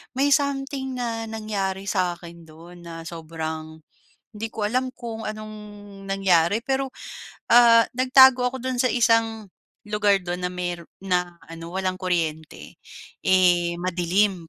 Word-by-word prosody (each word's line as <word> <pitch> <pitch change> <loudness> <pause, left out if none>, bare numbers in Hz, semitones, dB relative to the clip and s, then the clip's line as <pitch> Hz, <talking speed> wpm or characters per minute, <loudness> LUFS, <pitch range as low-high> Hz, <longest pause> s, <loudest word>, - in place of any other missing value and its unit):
may 280 +2 +2
something 270 -2 -1
na 230 -2 -3
nangyari 200 -3 -3
sa 180 -3 0
akin 170 -1 -12
dun 170 +3 -14
na 165 -1 -8
sobrang 160 -1 -6 0.6
hindi 220 +2 -4
ko 215 -2 -2
alam 255 +4 -1
kung 230 -2 -7
anong 215 0 -6 0.5
nangyari. 195 -1 +2
Pero 270 0 -1 0.6
ah, 230 -1 +7
nagtago 255 -1 +6
ako 265 - -5
dun 255 -1 -2
sa 255 - +3
isang 225 -3 +1 0.4
lugar 210 -1 +3
dun 180 0 -4
na 180 - +1
mayro'n 175 -2 -5 0.2
na 180 -2 -1
ano 165 0 -9
walang 185 -1 -1
kuryente, 160 -4 -3 0.5
eh, 175 -2 +3
madilim 180 0 0
195 Hz, 135 wpm, -24 LUFS, 175-230 Hz, 0.6 s, ah